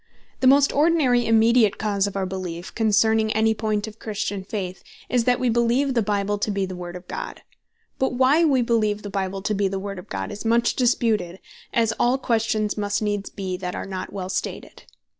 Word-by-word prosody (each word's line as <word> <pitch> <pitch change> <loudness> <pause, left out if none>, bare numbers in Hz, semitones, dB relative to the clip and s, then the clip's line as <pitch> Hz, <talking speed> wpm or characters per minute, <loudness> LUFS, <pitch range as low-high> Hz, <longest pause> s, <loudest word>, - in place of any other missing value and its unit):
The 260 - +3
most 280 +1 +5
ordinary 285 -6 +3
immediate 225 -1 +4
cause 205 -1 0
of 200 - -6
our 195 - 0
beleef, 180 -2 -6
concerning 220 0 +2
any 220 +1 +3
point 215 -1 -1
of 220 0 -11
Christian 205 -2 -3
Faith, 190 -2 -5 0.3
is, 245 -2 +1
that 250 -1 +3
wee 255 - 0
beleeve 235 +4 +2
the 235 - +2
Bible 205 0 -1
to 210 - -1
be 200 -1 0
the 185 -1 -6
Word 175 0 -7
of 180 0 -10
God. - - -6 0.6
But 265 -1 +1
why 265 +6 +4
wee 270 -6 +3
beleeve 215 -3 0
the 205 - -6
Bible 195 0 -3
to 215 - 0
be 200 -1 +1
the 195 0 -3
Word 195 0 -5
of 180 - -13
God, 95 0 -4
is 205 - -7
much 235 +1 +2
disputed, 220 -7 +1 0.3
as 230 -1 +2
all 245 +2 +3
questions 220 -4 0
must 205 +1 -1
needs 205 -1 -2
bee, 190 -2 -4
that 180 -1 -5
are - - -4
not 190 -1 -6
well 190 -2 -5
stated. - - -5
215 Hz, 205 wpm, -23 LUFS, 195-235 Hz, 0.6 s, most